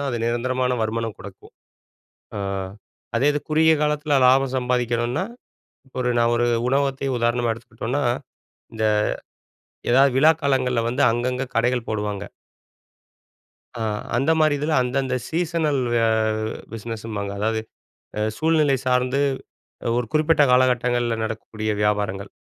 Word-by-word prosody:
தான் 140 - -2
அது 120 - -2
நிரந்தரமான 125 +2 0
வருமானம் 115 0 -2
குடுக்கும். 95 0 -12 0.8
அ - - -3 0.8
அதே 135 +5 +3
இது 145 - 0
குறுகிய 160 +1 +5
காலத்துல 150 -1 +1
லாபம் 135 +1 +3
சம்பாதிக்கணும்னா 125 +3 0 0.8
ஒரு 125 -1 0
நான் 120 0 +3
ஒரு 120 0 +2 0.2
உணவகத்தையே 135 0 0
உதாரணமா 120 0 +1
எடுத்துக்கிட்டோம்னா, 115 +4 -4 0.7
இந்த 110 -1 -2 1.1
ஏதாவது 135 +2 +5
விழா 155 +4 +6
காலங்கள்ல 130 -4 +1
வந்து 125 +4 0
அங்கங்க 125 +3 -1
கடைகள் 120 0 +1
போடுவாங்க. 105 -2 -3 1.6
அ - - -1 0.3
அந்த 135 +6 +1
மாரி 155 -2 +4
இதுல 150 +3 -1
அந்தந்த 130 +1 -1
சீசனல் 165 -4 0 0.3
அ - - +3 0.6
பிசினஸ்ஸு 115 0 -6
ம்பாங்க. 100 -2 -3
அதாவது 110 +2 0 0.6
அ - - 0 0.2
சூழ்நிலை 155 -3 +3
சார்ந்து 125 +2 +1 0.8
ஒரு 120 -1 0
குறிப்பிட்ட 155 0 +3
காலகட்டங்கள்ல 125 -2 +2
நடக்கக்கூடிய 110 -1 -4
வியாபாரங்கள். 105 -1 -1
125 Hz, 120 wpm, -23 LUFS, 115-140 Hz, 1.6 s, விழா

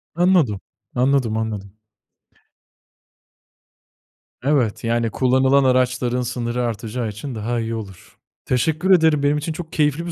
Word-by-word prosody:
Anladım, 170 - +3 0.4
anladım, 125 -3 +1
anladım. 105 -3 -4 2.7
Evet, 130 -7 +1
yani 115 0 0
kullanılan 130 +3 +3
araçların 125 -1 +1
sınırı 120 0 -2
artacağı 115 0 -3
için 115 +5 -7
daha 115 +3 -2
iyi 115 0 -3
olur. 100 -5 -10 0.3
Teşekkür 160 +9 +1
ederim. 160 -5 +4
Benim 145 +1 +2
için 155 +2 -3
çok 160 0 -8
keyifli 150 +1 +1
bir 170 - -4
125 Hz, 120 wpm, -21 LUFS, 115-145 Hz, 2.7 s, ederim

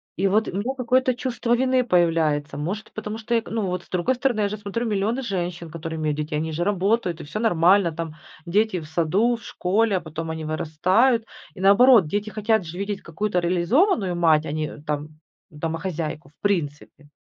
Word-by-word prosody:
И 195 +3 +1
вот 215 +3 +2
у - - -3
меня 240 +7 -1
какое-то 255 +1 +2
чувство 245 -1 -1
вины 255 0 +2
появляется. 165 - +1
Может, 190 +9 -4
потому 215 0 -5
что 225 +1 -4
эк 230 -1 -1
ну, 225 -3 -1
вот 180 -1 -3
с - - -25
другой 185 +8 0
стороны, 245 -4 0
я 205 - +1
же 210 - -4
смотрю: 210 +3 -3
миллионы 220 +4 0
женщин, 175 -6 -4
которые 165 0 -6
имеют 150 -1 -1
детей, 150 0 -2
они 160 +1 -2
же 170 - -1
работают, 195 -2 0
и - - -7
всё 150 +9 -5
нормально 185 -3 +4
там- 160 -1 -6 0.3
дети 200 +1 +1
в 155 - -9
саду, 180 +9 +1
в 230 - -12
школе, 200 +2 +1
а - - -4
потом 160 +1 -6
они 160 -1 -5
вырастают. 185 +10 +2 0.3
И 185 - -12
наоборот, 200 0 +6
дети 205 +5 -2
хотят 215 -1 +1
же 160 +3 -8
видеть 200 0 -3
какую-то 180 +3 -1
реализованную 185 - +2
мать, 160 -2 +3
а - - -4
не, 155 - -2
э, 150 - -10
там 150 0 -5 0.3
домохозяйку 160 -1 -4
в 150 - -36
принципе. 150 -6 -2
185 Hz, 200 wpm, -23 LUFS, 160-220 Hz, 0.3 s, наоборот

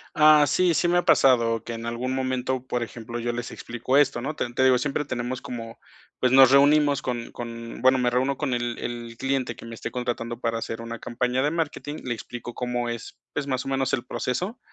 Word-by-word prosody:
Ah, 150 -1 +7
sí. 175 +4 +3
Sí 175 - +2
me 175 - +3
ha 175 - +1
pasado 115 -4 +4
que 115 - -6
en 115 0 -6
algún 120 +2 -2
momento, 130 -1 -1
por 125 -1 -1
ejemplo, 115 +1 -7
yo 120 +1 -1
les 120 0 -5
explico 120 +3 -1
esto, 135 -4 +3
¿no? 155 +5 -3
Te 120 - -3
te 130 - +1
digo, 130 -1 +6
siempre 140 +3 -1
tenemos 125 0 -3
como 115 -2 -7 0.4
pues 125 -1 +2
nos 130 -1 +8
reunimos 145 +1 +5
con 120 -2 -4
con, 115 -1 -7
bueno, 130 +1 +5
me 125 - +2
reúno 130 +3 0
con 145 -4 -1
el 120 -1 -2
el 120 -1 -6
cliente 135 -3 -1
que - - -12
me 115 0 -7
esté - - -6
contratando 120 -1 -3
para 115 -2 -1
hacer 115 0 -5
una 115 0 -6
campaña 125 +2 -1
de 150 - +1
marketing, 155 -2 -3
le 125 - -2
explico 120 +1 -7
cómo 120 -1 -2
es, 115 -1 -6 0.2
pues 145 - -2
más 130 -2 -1
o - - -6
menos 135 -1 0
el 125 -2 0
proceso. 180 - -3
125 Hz, 225 wpm, -25 LUFS, 120-135 Hz, 0.4 s, nos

